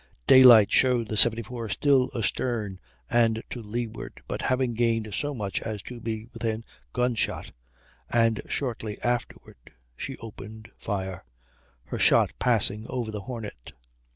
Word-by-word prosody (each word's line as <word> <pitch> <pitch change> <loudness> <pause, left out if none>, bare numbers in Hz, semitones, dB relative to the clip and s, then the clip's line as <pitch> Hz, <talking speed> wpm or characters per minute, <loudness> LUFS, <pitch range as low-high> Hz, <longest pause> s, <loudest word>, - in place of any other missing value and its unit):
Daylight 120 - +8
showed 125 -4 +3
the 110 - -2
74 115 +2 +3
still 135 +3 +3
astern 110 -3 -2 0.3
and 115 -1 +2
to 120 - -5
leeward, 115 +1 -6
but - - -4
having 130 -2 0
gained 115 -2 0
so 145 +5 -2
much 100 -5 -3
as 105 -3 -5
to 125 -1 -8
be 110 -1 -4
within 115 -1 -3 0.3
gunshot, 125 -2 -1 0.6
and 115 -2 +2
shortly 115 -6 -3
afterward 120 - -4 0.2
she 135 - -6
opened 110 0 -10
fire, 95 -3 -4 0.6
her - - -6
shot - - +5
passing 110 -2 +1
over 120 -4 -3
the 105 -1 -5
Hornet. 105 - -8
115 Hz, 130 wpm, -26 LUFS, 110-120 Hz, 0.6 s, Daylight